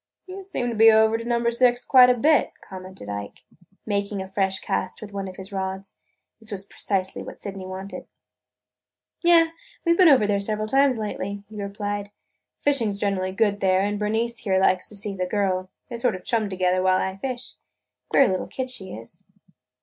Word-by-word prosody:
"You 385 +1 -8
seem 315 -10 -3
to 235 - -3
be 225 +1 +7
over 220 0 +4
to 230 - -3
Number 235 0 +1
Six 245 0 +2
quite 255 -2 +7
a 250 - +3
bit," 295 +2 +3
commented 185 - -10
Ike, 100 0 -6 0.4
making 200 -1 -2
a 190 - -5
fresh 190 0 0
cast 190 -2 -3
with 205 -2 -10
one 195 -1 -4
of 185 - -8
his 190 +2 -9
rods. 190 0 -5 0.4
This 220 -1 -11
was 195 -3 -4
precisely 195 -2 -2
what - - -9
Sydney 195 -2 -6
wanted. 190 +1 -7 1.1
"Yes, 335 -1 +5 0.3
we 335 - +4
have 340 - +2
been 360 -3 +8
over 210 -7 +4
several 215 +1 -1
times 270 +1 +3
lately," 205 -2 -4
he 210 -1 -6
replied. 205 0 -4 0.5
"Fishing 270 -7 +2
's 200 - -4
generally 190 -2 -1
good 205 0 +1
there 190 -1 +3
and 205 +1 -1
Bernice 225 +3 -1
here 195 -4 0
likes 185 -1 +2
to 210 - -10
see 200 0 -3
the 180 -1 -2
girl. 185 -2 -1 0.2
They 240 - -6
sort 235 -3 0
of 185 - -9
chum 225 -4 0
together 185 -1 +1
while 185 0 +3
I 190 0 -2
fish. 250 +3 -5 0.6
Queer 275 - +5
little 185 -1 -1
kid 260 -1 -4
she 190 -6 -7
is!" 115 +2 -13
205 Hz, 195 wpm, -24 LUFS, 190-235 Hz, 1.1 s, been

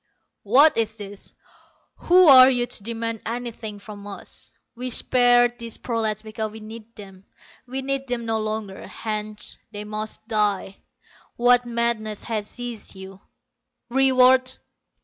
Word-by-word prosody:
"What 270 +9 +5
is 225 -1 0
this? 205 -1 -8 0.6
Who 360 0 +5
are 260 -2 +10
you 245 -2 +1
to 235 - -4
demand 230 0 -4
anything 230 -2 -5
from 205 0 -11
us? 200 - -9 0.2
We 250 +1 -5
spared 245 0 +3
these 230 -1 -4
prolats 220 -3 -2
because 215 0 -5
we 220 - -10
needed 220 +1 -11
them: 195 -3 -12 0.4
we 265 +2 -4
need 275 0 -2
them 245 -2 -3
no 225 -1 -1
longer, 215 -2 -5
hence 215 -1 -6
they 205 0 -6
must 215 +1 -6
die. 205 -3 0 0.6
What 245 0 +4
madness 235 -3 -1
has 215 -3 -3
seized 240 -4 -8
you? 190 0 -11 0.7
Reward! 260 0 +4
225 Hz, 135 wpm, -23 LUFS, 215-245 Hz, 0.7 s, are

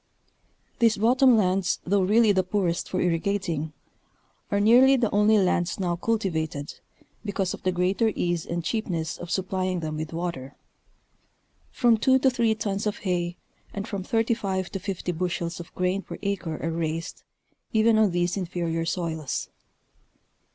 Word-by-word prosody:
These 230 -2 +4
bottom 250 +3 +5
lands 190 -2 +1
though 200 +2 +2
really 215 +3 +4
the 190 -2 +3
poorest 185 -2 -1
for 185 - -1
irrigating, 170 -2 -1 0.8
are 200 - +1
nearly 245 +6 +6
the 235 -4 +1
only 210 +1 +4
lands 180 -1 +1
now 175 -2 0
cultivated, 165 -8 -2 0.5
because 195 -3 -2
of - - -8
the 185 - +1
greater 185 +5 +1
ease 175 -2 -1
and 170 0 -4
cheapness 170 -5 -2
of 175 - -7
supplying 185 0 -1
them 155 -1 -4
with 155 0 -5
water. 165 -6 -5 1.1
From 235 -3 +3
two 260 +3 +4
to. 265 0 +3
three 230 -3 +1
tons 205 -1 -2
of 210 - -2
hay 175 -2 -2 0.4
and 200 +2 -4
from 200 -4 -4
35 205 -3 -1
to 195 - -4
50 185 -2 -3
bushels 175 0 -3
of 175 - -9
grain 185 +2 0
per - - -8
acre 190 -6 -2
are 165 - -1
raised 165 0 -3 0.5
even 220 0 +4
on 215 -2 +4
these 175 0 0
inferior 170 -3 -2
soils. 165 -4 -3
185 Hz, 150 wpm, -26 LUFS, 170-210 Hz, 1.1 s, nearly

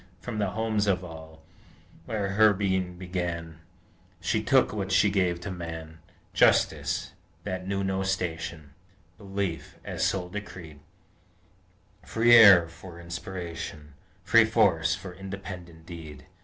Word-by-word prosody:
From 115 -3 -5
the 100 -2 0
homes 110 0 -1
of 95 -2 +1
all, 80 -2 -11 0.6
where 105 -3 -2
her 105 +1 +5
being 95 -2 -1
began, 85 -3 -4 0.6
She 100 +6 0
took 130 +1 +3
what 100 -2 -3
she 100 +1 +4
gave 90 -3 +1
to 100 - -5
Man; 80 -2 -7 0.3
Justice, - - +2 0.3
that 95 -2 -4
knew 100 0 -1
no 95 0 -1
station, 85 -5 -3 0.5
Belief, 100 -4 -4
as - - -3
soul 90 -2 0
decreed, 90 -7 -8 1.2
Free 120 +1 +3
air 100 -7 +9
for 85 +1 -12
aspiration, 85 -3 -7 0.3
Free 115 -1 +6
force 100 -8 +2
for 95 -2 -9
independent 90 -3 -9
deed! 80 -4 -10
95 Hz, 125 wpm, -27 LUFS, 85-100 Hz, 1.2 s, air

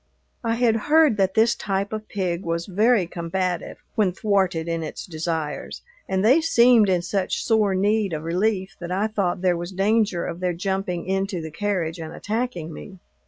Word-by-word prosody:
I 230 -1 0
had 230 -2 +3
heard 305 -6 +5
that 190 -1 +1
this 225 +1 +4
type 200 +1 -2
of 215 0 -5
pig 180 -4 -2
was 170 0 -2
very 210 +1 +3
combative 175 +1 -3 0.2
when 200 -4 +1
thwarted 190 -5 0
in 165 -1 -1
its 155 - -6
desires, 160 -2 -4 0.3
and 190 +1 +1
they 265 +9 +6
seemed 235 -8 +5
in 180 -2 +1
such 190 +1 -1
sore 215 -4 +2
need 205 +1 +1
of 155 -1 -4
relief 190 +3 -1
that 175 0 -6
I 195 +3 +1
thought 200 -5 -1
there 180 -1 +3
was 175 +2 -5
danger 200 -1 +1
of 170 - -5
their 180 -1 0
jumping 190 -1 -2
into 195 0 -1
the 160 -1 -6
carriage 180 -3 -2
and 160 -1 -6
attacking 205 -6 -3
me. 190 +4 -10
190 Hz, 180 wpm, -23 LUFS, 175-215 Hz, 0.3 s, they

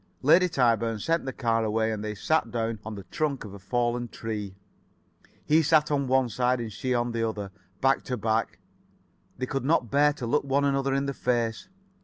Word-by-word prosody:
Lady 170 +6 +5
Tyburn 115 -6 +2
sent 165 +10 0
the 135 - -2
car 115 -3 0
away, 110 +1 0
and 105 -1 -4
they 105 0 -4
sat 135 +4 +1
down 115 -1 -2
on 110 -1 -6
the 100 - -8
trunk 140 +3 -2
of 100 - -9
a 100 - -9
fallen 120 +4 -1
tree. 105 -4 -5 0.9
He 155 +2 +4
sat 155 -1 +3
on 140 -2 +1
one 130 0 +3
side, 125 +2 0
and 115 -2 -4
[Pg - - -11 0.2
63]she - - +2
on 120 0 -1
the 115 -1 0
other, 105 -3 -6 0.3
back 135 +1 +3
to 125 - -2
back. 110 +1 -1 0.8
They 130 - -2
could 135 0 -3
not 135 -5 +1
bear 145 +1 +4
to 135 -4 -6
look 145 +6 +1
one 140 +1 +1
another 135 -1 +1
in 140 0 0
the 140 - -2
face. 120 +5 -1
120 Hz, 210 wpm, -27 LUFS, 110-140 Hz, 0.9 s, Lady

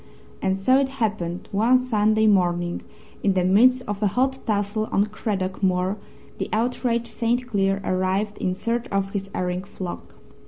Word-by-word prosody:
And 190 0 +1
so 255 +8 +4
it 275 -1 +1
happened 205 -7 -2
one 225 +6 +4
Sunday 220 -3 +2
morning, 175 -4 +2 0.4
in 195 -2 +2
the 185 - +2
midst 250 +7 +5
of 205 0 -4
a 210 - +3
hot 265 +6 0
tussle 210 0 0
on 200 - +3
Craddock 205 -3 -3
Moor, 185 0 +1 0.4
the - - -3
outraged 235 +1 0
St. 240 +2 -1
Cleer 195 -4 +1
arrived 190 +3 -1
in 185 0 -1
search 230 +4 -2
of 195 0 -1
his 195 -1 -4
erring 180 0 -2
flock. 185 -2 -8
205 Hz, 160 wpm, -24 LUFS, 190-230 Hz, 0.4 s, midst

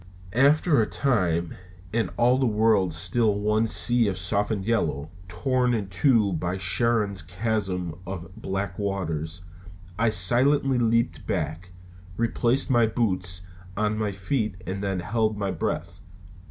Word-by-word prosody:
After 145 +3 +4
a 105 - 0
time 90 -11 0 0.4
and 115 -5 0
all 125 +2 +3
the 130 - +2
world 105 -4 +2
still 100 +6 +2
one 105 +2 +1
sea 120 +1 +4
of 95 -2 -2
softened 100 +2 -1
yellow, 80 -10 -1 0.2
torn 125 +5 0
in 100 -3 -3
two 105 0 +2
by 85 +3 -2
Charon's 100 +1 +1
chasm 90 -1 -3
of 90 -1 -7
black 95 -1 -4
waters 90 -4 -3 0.6
I 115 0 +3
silently 125 +7 +3
leaped 115 +1 0
back, 90 -2 -3 0.5
replaced 120 +3 0
my 120 -2 +4
boots 90 -6 -1 0.3
on 105 0 0
my 105 -1 -2
feet 100 +2 -2
and 95 +1 -4
then 95 -2 -2
held 110 +3 -1
my 100 -2 -2
breath. 85 0 -4
105 Hz, 135 wpm, -25 LUFS, 90-115 Hz, 0.6 s, After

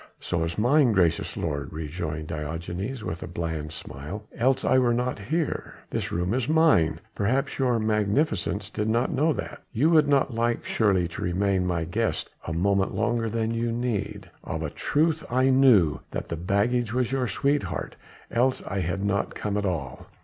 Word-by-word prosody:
"So 85 - -1
is 85 0 -3
mine, 125 +2 +4
gracious 85 -4 +1
lord," 70 -4 -3
rejoined 80 0 -4
Diogenes 85 - -4
with 85 - -4
a - - -5
bland 80 -2 -4
smile, 80 +8 -7
"else 130 +2 +2
I 130 - +4
were 120 -2 +3
not 125 0 -1
here. 155 +9 -2 0.2
This - - -2
room 90 +4 0
is 130 +1 -1
mine 150 - +4
perhaps 130 +9 0
your 125 -3 +2
Magnificence 105 - 0
did 105 0 -1
not 120 +3 +1
know 150 +5 +2
that - - -6
you 140 +7 +2
would 155 -3 +5
not 140 -2 +2
like 115 +1 0
surely 95 -5 +2
to - - -7
remain 95 +1 +1
my 85 -2 0
guest 110 +7 -2 0.2
a - - -2
moment 95 +3 +1
longer 115 +2 0
than 115 0 -1
you 115 0 -1
need." 120 -3 -2 0.2
"Of - - -4
a - - -3
truth 160 +1 +1
I 130 +2 +3
knew 120 - +5
that - - -5
the - - -2
baggage 110 +7 0
was 125 -1 +1
your 130 -2 0
sweetheart 135 - -1 0.4
else 125 +2 +1
I 100 - -2
had 90 +3 -1
not 100 0 0
come 105 -1 -2
at 100 -1 0
all." 75 -8 -4
105 Hz, 180 wpm, -26 LUFS, 85-125 Hz, 0.4 s, would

